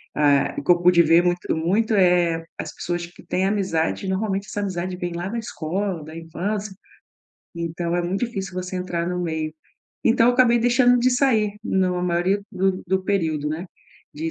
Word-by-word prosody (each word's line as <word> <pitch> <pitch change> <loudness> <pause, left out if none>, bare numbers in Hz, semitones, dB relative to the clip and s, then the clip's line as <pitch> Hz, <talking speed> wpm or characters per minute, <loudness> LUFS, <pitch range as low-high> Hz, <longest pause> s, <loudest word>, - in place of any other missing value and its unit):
ah, 145 -2 +3
o - - -7
que 160 - +4
eu 175 - +4
pude 175 -1 +6
ver 165 +2 +5
muito 175 -2 0
muito, 205 +7 +1
eh, 175 -3 +3
as - - -5
pessoas 175 0 -3
que 175 - -17
têm 185 +1 0
amizade, 190 -3 -1
normalmente 195 +1 -1
essa 205 - -4
amizade 185 -2 -3
vem 175 -1 -4
lá 175 +2 -4
da 230 +1 -3
escola, 185 -3 -3
da 155 +1 -10
infância, 195 +6 -4 0.8
então 170 0 -3
é 175 - 0
muito 180 +3 -2
difícil 195 -6 -5
você 185 0 -4
entrar 175 -2 -2
no 180 0 -2
meio. 160 -2 -2 0.5
Então 230 0 +4
eu 245 - +3
acabei 245 -2 +5
deixando 245 +1 +4
de 255 +1 +3
sair 225 -6 +2
no 185 -3 +1
maioria 180 +3 +1
do 190 0 0
do 190 +1 0
período, 160 -7 0
né, 160 +5 -4 0.5
de 160 +2 -3
180 Hz, 185 wpm, -23 LUFS, 170-205 Hz, 0.8 s, pude